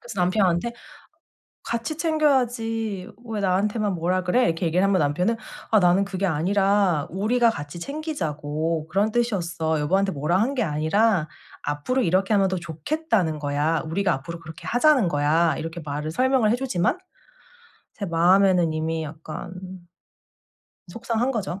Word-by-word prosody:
그래서 235 -6 -6
남편한테 185 +3 +1 0.9
"같이 235 +7 -3
챙겨야지. 240 - 0 0.2
왜 220 -2 -3
나한테만 200 +2 0
뭐라 180 +2 0
그래?" 210 +8 +2
이렇게 165 +2 -1
얘기를 170 +3 +2
하면 195 -1 +3
남편은 180 +9 +1 0.3
"아 220 - +5
나는 180 +2 +4
그게 195 -1 -3
아니라 190 -1 +2
우리가 230 +6 +2
같이 145 -4 -7
챙기자고. 160 - -3
그런 205 +5 +1
뜻이었어. 170 -9 0
여보한테 190 +6 +1
뭐라 155 +5 0
한 255 +6 +1
게 250 - 0
아니라 160 +2 +1 0.3
앞으로 145 - -1
이렇게 190 +3 +1
하면 195 -1 +3
더 185 - -1
좋겠다는 170 - -1
거야. 150 +2 0
우리가 185 +4 0
앞으로 165 +6 -7
그렇게 160 -1 -11
하자는 250 - +4
거야." 155 +1 +2
이렇게 165 +2 -5
말을 150 +1 -4
설명을 255 +3 +2
해 235 - +2
주지만 250 - 0 1.0
제 200 - -5
마음에는 175 0 +4
이미 160 +1 -2
약간 155 +2 -8 1.4
속상한 230 +5 -1
거죠. 200 -6 -3
185 Hz, 340 characters per minute, -24 LUFS, 160-225 Hz, 1.4 s, 아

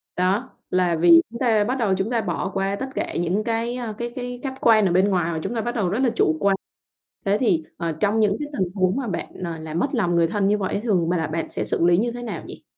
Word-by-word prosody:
Đó, 190 +7 0 0.2
là 180 -2 +2
vì 165 0 +7
chúng 235 +1 -8
ta 225 -4 +3
bắt 250 +5 -1
đầu 215 -6 +1
chúng 195 +4 -1
ta 230 -2 +1
bỏ 175 0 -2
qua 195 0 0
tất 265 +5 -5
cả - - -2
những 175 +5 0
cái, 230 +2 -1
ơ, 240 -3 -4
cái 240 +1 -3
cái 245 -1 -5
khách 265 -2 -4
quan 215 -3 +5
ở 180 - +2
bên 190 +3 +3
ngoài, 175 -3 +1
mà 160 - -2
chúng 240 - -3
ta 225 - 0
bắt 240 +2 -3
đầu 200 -6 0
rất 210 +7 -1
là 260 -2 +3
chủ 155 -7 +2
quan. 200 -1 +3 0.7
Thế 200 +1 +2
thì, 175 -11 +2
ờ, 170 -1 -2
trong 210 +2 +2
những 210 -2 +3
cái 295 - -3
tình 180 -2 0
huống 185 +1 +2
mà 270 -3 -2
bạn 185 - -3
nà 170 -3 -5
làm 160 +1 -4
mất 275 - +2
lòng 175 -7 +1
người 170 -1 +4
thân 200 +2 0
như 210 +1 +3
vậy 195 -2 -2
á, - - 0
thường 180 -8 +1
bà 180 - +1
là 160 - -1
bạn 165 +1 -3
sẽ - - -3
xử 170 - 0
lý 175 0 +5
như 235 +5 +1
thế 240 +1 -7
nào 235 - -5
nhỉ? - - -10
200 Hz, 290 wpm, -23 LUFS, 175-235 Hz, 0.7 s, vì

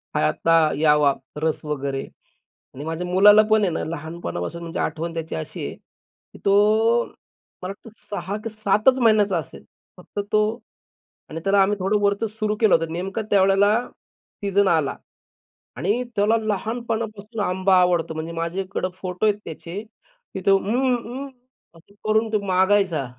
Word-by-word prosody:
हा 75 - +3
आता 165 - +2 0.2
यावा, 150 -2 +4 0.3
रस 160 -1 -1
वगैरे 140 -2 -3 0.7
आणि 140 +3 -8
माझ्या 165 +2 -3
मुलाला 205 +4 +7
पण 220 0 +5
आहे 185 - +2
ना, - - -2
लहानपणापासून 160 - -5
म्हणजे 165 - -5
आठवण 165 +1 -2
त्याची 165 -1 -4
अशी 80 - -5
आहे, - - -7 0.6
की - - -13
तो 215 +4 +4 0.6
मला 185 - -4
वाटतं 225 - -15 0.2
6 205 0 -4
की 225 - -3
7च 215 +4 +2
महिन्याचा 210 -5 +3
असेल, 160 - -7 0.3
फक्त 180 +3 -8
तो 215 - +4 0.9
आणि 160 +1 -5
त्याला 195 0 +4
आम्ही 205 +2 +2
थोडं 200 +3 +1
वरचं 200 +2 +1
सुरू 215 0 -2
केलं 220 - +6
होतं. 165 -1 -1
नेमकं 195 +5 -3
त्यावेळेला 195 0 +4 0.8
सीजन 200 0 +2
आला 160 -5 +1 0.8
आणि 210 +7 0
त्याला 210 +3 +3
लहानपणापासून 220 0 -3
आंबा 185 +1 +2
आवडतो. 175 -3 +1
म्हणजे 160 +1 -5
माझ्याकडं 185 +3 -3
फोटो 185 +3 -2
आहेत 210 -1 +2
त्याचे, 170 +5 -7 0.5
तिथं 190 +1 0
"उम्म, 245 +6 +2
उम्म" 245 +4 -6 0.5
असं 185 +5 -21
करून 220 +1 +2
तो 210 - +2
मागायचा 185 -5 +2
195 Hz, 150 wpm, -23 LUFS, 165-215 Hz, 0.9 s, मुलाला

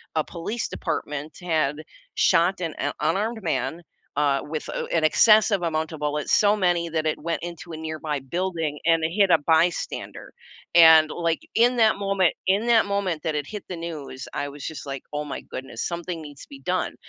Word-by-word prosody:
a 155 - +2
police 190 +9 -4
department 150 +1 -4
had 155 -5 0 0.4
shot 180 +1 +3
an 165 -3 -2
u 145 - 0
unarmed 210 +9 0
man, 160 -2 -1 0.4
uh, 140 -2 +2
with 155 0 -5
o - - -3
an 160 - +1
excessive 215 +4 +5
amount 160 -1 -1
of 160 - -8
bullets, 150 0 -2
so, 205 0 +5
many 175 -4 +1
that 160 -1 -1
it 155 - 0
went 165 +2 -3
into 170 0 -7
a - - -5
nearby 155 -1 -3
building 165 0 -3
and, 165 -1 +3
uh, - - +3
hit 200 -2 +5
a - - +6
by 160 0 +5
bystander, 175 - -6 0.4
and, 160 -2 +8
like, 170 -1 -1
in 240 +2 +4
that 220 -2 +4
moment 195 -3 +2
in 200 +4 +2
that 230 -2 +5
moment 200 -5 -1
that 160 -2 -1
it 145 -1 -2
hit 210 -2 -7
the 180 - -5
news, 155 -6 -7
I 145 - -2
was 140 -1 -9
just 160 - -6
like, 135 -1 -6
"Oh 150 0 -2
my 145 - -5
goodness, 130 -3 -7
something 170 -1 -4
needs 145 -2 -11
to - - -17
be - - -12
done," 180 +3 -1
165 Hz, 200 wpm, -24 LUFS, 150-185 Hz, 0.4 s, and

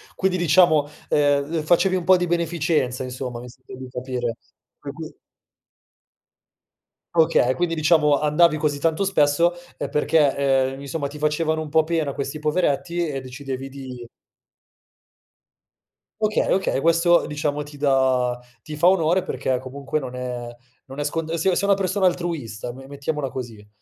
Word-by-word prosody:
Quindi 185 -1 0
diciamo, 160 -3 +4 0.2
ehm 145 +1 +2
ehm, 160 - -1
facevi 180 +4 +3
un 180 - -1
po' 185 -1 +6
di 180 - -1
beneficenza 165 -6 0
insomma, 125 -1 -5
mi 125 - -10
sembra 130 +1 -13
di 130 0 -9
capire. 125 -2 -3 0.4
Poi - - -7
qui - - -8 2.0
Okay. 160 -6 +3
Quindi 175 -1 -1
diciamo 150 -2 +3
andavi 155 +1 +3
così 145 -1 0
tanto 165 +5 +1
spesso, 170 -2 +3 0.2
uhm, - - -4
perché, 150 -1 +2 0.4
ehm, 135 - -9
i - - -10
insomma 140 +1 -3
ti 145 +2 -10
facevano 155 +1 0
un 155 - -6
po' 160 +1 +3
pena 160 -4 -1
questi 140 +2 -4
poveretti 170 +2 0
e 135 -2 -4
decidevi 135 +1 -6
di 130 -3 -9 2.2
Okay, 215 0 +1
okay, 190 -7 0
questo 170 +2 +3
diciamo 150 0 -2
ti 145 0 -12
dà 130 -3 +1 0.2
ti 155 -1 -7
fa 170 - +4
onore 180 -1 +3
perché 130 -4 -2
comunque 140 +3 -4
non 130 -3 -7
è 125 -1 -5 0.4
non 135 +2 -9
è - - 0
scont 160 +2 -3
se 170 +3 +1
sei 200 - 0
una 200 - +5
persona 190 0 0
altruista, 160 - -2
me 135 +2 -12
mettiamola 140 0 -3
così. 115 -5 -8
150 Hz, 155 wpm, -23 LUFS, 130-170 Hz, 2.2 s, po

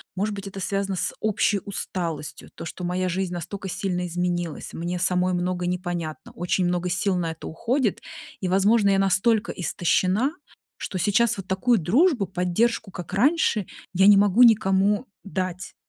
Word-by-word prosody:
может 205 +3 -1
быть, 200 0 -7
это 195 0 -7
связано 195 0 -1
с - - -1
общей 210 -1 +1
усталостью. 170 -6 -5
То, - - -7
что 180 - -7
моя 180 +1 -1
жизнь 185 0 -2
настолько 185 +3 -5
сильно 180 -1 -2
изменилась, 175 -2 -3
мне 175 +2 -3
самой 180 0 +1
многое 180 0 -1
непонятно, 175 -3 -4
очень 180 +1 0
много 180 0 0
сил 185 +2 0
на 165 -2 -1
это 160 - -9
уходит. 235 - -1 0.4
И, 185 - -1
возможно, 200 +2 +4
я 195 - +3
настолько 205 +4 +2
истощена, 185 - +1 0.5
что 190 - -5
сейчас 210 +4 +2
вот 195 - -7
такую 215 +5 +2
дружбу, 240 - +3
поддержку, 190 +4 0
как 175 -3 -8
раньше, 275 - +2 0.3
я 190 +2 +5
не 205 - +9
могу 205 +4 +5
никому 205 0 +4 0.2
дать, 185 -2 -4
190 Hz, 160 wpm, -24 LUFS, 180-205 Hz, 0.5 s, не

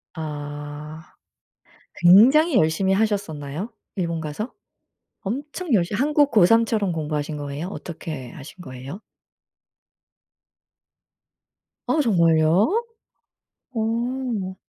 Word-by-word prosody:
아. 150 0 -7 0.9
굉장히 255 - +6
열심히 160 +5 +2
하셨었나요? 195 -5 -2 0.3
일본 170 -3 -2
가서? 155 - -5 0.7
엄청 290 - -4
열심 185 0 +1
한국 290 +2 +3
고3 225 +3 +5
처럼 210 -5 0
공부하신 150 -1 -3
거예요? 145 +4 -5
어떻게 155 -9 -7
하신 145 +7 -11
거예요? 130 - -9 2.9
아 315 - +1
정말요? 175 - +3 0.9
어. 230 -3 -2
180 Hz, 185 characters per minute, -23 LUFS, 155-225 Hz, 2.9 s, 굉장히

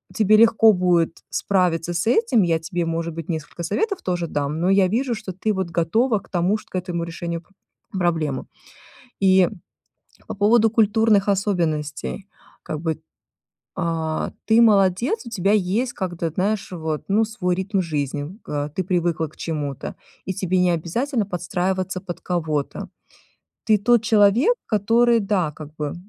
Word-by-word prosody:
тебе 215 -1 +4
легко 225 0 +6
будет 175 -3 +1
справиться 175 -3 0
с 170 - 0
этим, 245 - +3
я 165 -2 +1
тебе, 170 +1 -3
может 165 0 -2
быть, 165 -2 -6
несколько 160 +1 -5
советов 400 - -1
тоже 175 -2 -1
дам, 145 +1 -2
но 180 - +2
я 195 -1 +4
вижу, 240 +4 0
что 215 -4 -7
ты 205 +4 -1
вот 190 -3 -2
готова 215 +8 +1
к - - -21
тому, 180 +3 +1
чт - - -16
к - - -10
этому 180 -2 -2
решению 170 0 -5
про 195 - -30 0.5
проблемы. 160 -6 0 0.8
И 190 -2 +5 0.8
по - - -4
поводу 220 +3 +4
культурных 215 -2 +3
особенностей. 175 -4 -1 0.4
Как 155 - -5
бы, 160 -2 -2 0.8
а, 160 -1 -2
ты 225 +1 +5
молодец, 210 - +3
у 235 - -7
тебя 200 -2 +1
есть 215 +5 0
как 185 -3 -4
этот, 165 -2 -3
знаешь, 200 +2 -1
вот, 160 -3 -3
ну, 215 +3 +3
свой 190 -5 -2
ритм 190 +1 -1
жизни. 150 +2 -3
К, 145 -1 -3
э, - - -11
ты 190 - 0
привыкла 170 -3 0
к 155 - -20
чему-то, 145 -4 -4 0.3
и 190 - -2
тебе 185 0 0
не 180 -1 +3
обязательно 215 - -1
подстраиваться 185 0 -2
под 175 -2 -7
кого-то. 155 -5 -2 0.8
Ты 215 -1 +4
тот 235 +2 +3
человек, 220 - +4
который, 230 +3 +3
да, 195 -6 0
как 150 0 -11
бы, 150 -2 -3
185 Hz, 160 wpm, -22 LUFS, 165-215 Hz, 0.8 s, легко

